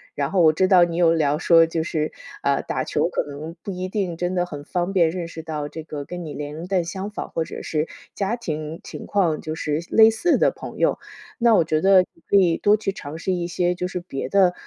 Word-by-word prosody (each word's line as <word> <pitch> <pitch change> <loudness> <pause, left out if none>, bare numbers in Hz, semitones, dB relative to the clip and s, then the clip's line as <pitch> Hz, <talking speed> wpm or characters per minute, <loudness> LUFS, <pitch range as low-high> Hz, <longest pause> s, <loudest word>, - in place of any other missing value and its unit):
然 140 0 -1
后 190 - +3
我 160 -2 +6
知 185 +4 +2
道 185 -2 +6
你 170 -1 -1
有 170 -1 +4
聊 150 -2 +1
说 165 -1 +6
就 165 0 -2
是， 155 -2 -2 0.3
呃， - - +2
打 - - -2
球 - - 0
可 - - -1
能 150 +4 -8
不 200 - -4
一 185 0 -4
定 190 -4 -2
真 175 +2 -2
的 175 -1 +1
很 145 -5 -8
方 175 +5 -2
便， 170 -4 +4
认 170 0 -4
识 165 -1 -8
到 155 -2 -4
这 160 - -7
个 150 -2 -7
跟 175 -1 -6
你 150 - -7
年 150 0 -5
龄 170 +3 -7
段 185 -2 +1
相 190 +3 -5
仿 210 - -6
或 165 - -1
者 - - -8
是 155 0 -1 0.3
家 200 +3 -1
庭 155 -8 -5
情 - - -8
况 175 -6 +1
就 155 0 -4
是 150 -1 -1
类 225 0 +7
似 330 +10 +2
的 - - +3
朋 - - -9
友。 - - +1 0.4
那 235 -2 +5
我 - - +4
觉 155 0 0
得 195 -1 +6
你 165 - -26
可 - - +2
以 180 -4 +5
多 205 +1 +4
去 205 -2 -2
尝 160 -5 -8
试 185 +3 -1
一 175 -1 -2
些 175 +1 0
就 180 0 -3
是 180 -1 -4
别 135 -6 -5
的， 190 -3 +4
170 Hz, 275 characters per minute, -23 LUFS, 155-185 Hz, 0.4 s, 类